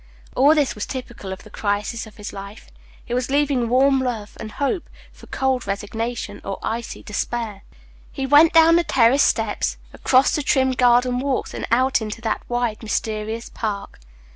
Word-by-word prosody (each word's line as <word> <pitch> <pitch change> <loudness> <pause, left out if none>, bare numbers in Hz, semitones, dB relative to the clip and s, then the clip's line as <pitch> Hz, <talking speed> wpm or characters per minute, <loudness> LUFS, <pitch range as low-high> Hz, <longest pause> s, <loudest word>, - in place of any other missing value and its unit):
All 285 +5 +5
this 290 -4 +2
was 210 - -5
typical 240 -7 -7
of 190 - -7
the 215 - -15
crisis 210 +2 -2
of 215 - -16
his 210 - -7
life. 200 +2 -10 0.3
He 240 - -5
was 250 +1 -1
leaving 275 -4 +1
warm 270 +2 +4
love 235 -5 -3
and 215 - -7
hope 290 +5 -2 0.2
for - - -16
cold 265 -3 -1
resignation 205 +2 -4
or 195 -1 -4
icy 230 +1 -4
despair. 215 -1 -3 0.5
He 270 - -3
went 290 +4 +6
down 330 +1 +6
the 345 - +3
terrace 260 -1 +4
steps, - - +1 0.2
across 260 +1 +3
the 300 - 0
trim 265 -2 +2
garden 250 0 +3
walks, 270 -1 -2
and - - -4
out 255 +2 +3
into 215 +1 -5
that 225 -2 -1
wide, 240 -3 -1
mysterious 220 +1 -3
park. 200 - -4
240 Hz, 170 wpm, -22 LUFS, 215-265 Hz, 0.5 s, went